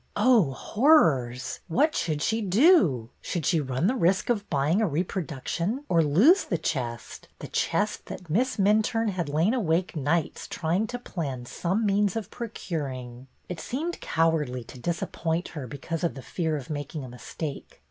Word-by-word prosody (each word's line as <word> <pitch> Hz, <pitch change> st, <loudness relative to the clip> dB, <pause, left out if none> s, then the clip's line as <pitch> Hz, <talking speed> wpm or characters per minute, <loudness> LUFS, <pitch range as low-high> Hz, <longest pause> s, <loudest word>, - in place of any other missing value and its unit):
Oh, 210 Hz, -, +4 dB
horrors! 135 Hz, -, +2 dB
What 295 Hz, -, +2 dB
should 155 Hz, -2 st, -1 dB
she 225 Hz, 0 st, +1 dB
do? 195 Hz, -, +4 dB
Should 170 Hz, -5 st, -3 dB
she 165 Hz, +1 st, +3 dB
run 130 Hz, +3 st, -1 dB
the 225 Hz, -, +3 dB
risk 195 Hz, -1 st, +2 dB
of 210 Hz, -3 st, -2 dB
buying 150 Hz, +7 st, +2 dB
a 220 Hz, -, +3 dB
reproduction, 175 Hz, -, -2 dB
or 170 Hz, -2 st, +4 dB
lose 215 Hz, -, +5 dB
the 175 Hz, -, -1 dB
chest, 120 Hz, -8 st, -4 dB
— -, -, -42 dB
the -, -, -8 dB
chest -, -, -1 dB
that 180 Hz, -, -8 dB
Miss 235 Hz, +12 st, +1 dB
Minturne 215 Hz, +2 st, +2 dB
had 175 Hz, -5 st, -3 dB
lain 160 Hz, -, +2 dB
awake 180 Hz, -7 st, 0 dB
nights 155 Hz, +2 st, -1 dB
trying 180 Hz, +6 st, -1 dB
to 245 Hz, -, -4 dB
plan 140 Hz, -, -5 dB
some 180 Hz, -, -1 dB
means 200 Hz, -1 st, +2 dB
of 220 Hz, -4 st, -4 dB
procuring? 135 Hz, -, -5 dB, 0.2 s
It 180 Hz, -2 st, -5 dB
seemed 320 Hz, +7 st, -4 dB
cowardly 150 Hz, -7 st, 0 dB
to 125 Hz, -, -12 dB
disappoint 170 Hz, +2 st, -2 dB
her 145 Hz, -6 st, -6 dB
because 155 Hz, +6 st, -5 dB
of 170 Hz, -, 0 dB
the 135 Hz, -, -8 dB
fear 160 Hz, -3 st, -2 dB
of 140 Hz, +1 st, -8 dB
making 145 Hz, 0 st, -4 dB
a -, -, -7 dB
mistake. 135 Hz, +4 st, -7 dB
170 Hz, 170 wpm, -27 LUFS, 145-210 Hz, 0.2 s, lose